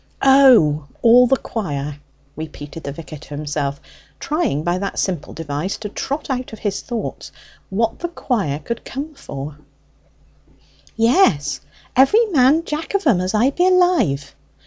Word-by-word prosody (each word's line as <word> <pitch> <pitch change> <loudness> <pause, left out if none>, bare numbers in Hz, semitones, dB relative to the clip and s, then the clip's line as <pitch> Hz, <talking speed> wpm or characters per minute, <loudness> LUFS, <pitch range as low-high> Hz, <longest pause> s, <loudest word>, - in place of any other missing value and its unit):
"O, 245 - +6 0.2
all 245 +2 +7
the 270 - +3
choir," 145 - -4 0.4
repeated 155 0 -8
the 140 - -3
vicar 155 0 -9
to - - -15
himself, 145 -1 -3 0.4
trying 295 - -1
by 175 +2 0
that 195 0 -4
simple 180 -6 -2
device 160 +4 -4
to 210 - -6
trot 280 +8 -4
out 255 -1 -3
his 205 -2 -3
thoughts 235 -3 -5 0.4
on 190 - -4
what 230 0 0
the 345 - -2
choir 220 - -2
could 220 +10 -5
come 290 +4 -6
for. 145 - -8 1.4
"Yes; 155 - +3 0.3
every 415 - +5
man 290 +2 +4
jack 310 +5 -4
of 400 - 0
'em, 215 - +4
as 185 +3 -1
I 240 +6 +3
be 355 +5 +2
alive!" 355 - +2
210 Hz, 145 wpm, -20 LUFS, -, 1.4 s, all